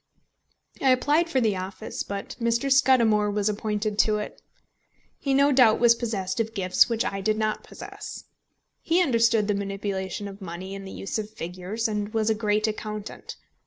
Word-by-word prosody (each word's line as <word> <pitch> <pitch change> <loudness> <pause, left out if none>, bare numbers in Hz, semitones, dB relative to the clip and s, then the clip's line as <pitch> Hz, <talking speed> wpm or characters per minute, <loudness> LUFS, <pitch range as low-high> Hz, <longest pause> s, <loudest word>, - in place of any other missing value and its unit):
I 270 - +4
applied 295 +6 +3
for 265 - +2
the 220 -5 +2
office, 185 +1 -6
but 200 0 -5
Mr. 235 +3 0
Scudamore 235 -6 +4
was 205 0 0
appointed 210 0 -2
to 215 -1 +4
it. 210 - -6 0.8
He 275 - -2
no 280 +1 +4
doubt 250 -5 +5
was 235 -1 +6
possessed 220 -5 -3
of 225 0 -2
gifts 185 +3 +3
which 230 -1 0
I 195 0 -2
did 215 +2 +1
not 215 -1 -1
possess. - - -9 0.6
He 335 +2 +2
understood 230 -6 +3
the 210 - +2
manipulation 195 0 -3
of 200 +1 -10
money 185 +1 -7
and 195 0 -7
the - - -8
use 195 - -4
of 210 -1 -5
figures, 185 +3 -4
and 210 -1 -3
was 220 0 +2
a - - +4
great 210 0 0
accountant. 215 -1 -6
215 Hz, 175 wpm, -25 LUFS, 200-230 Hz, 0.8 s, was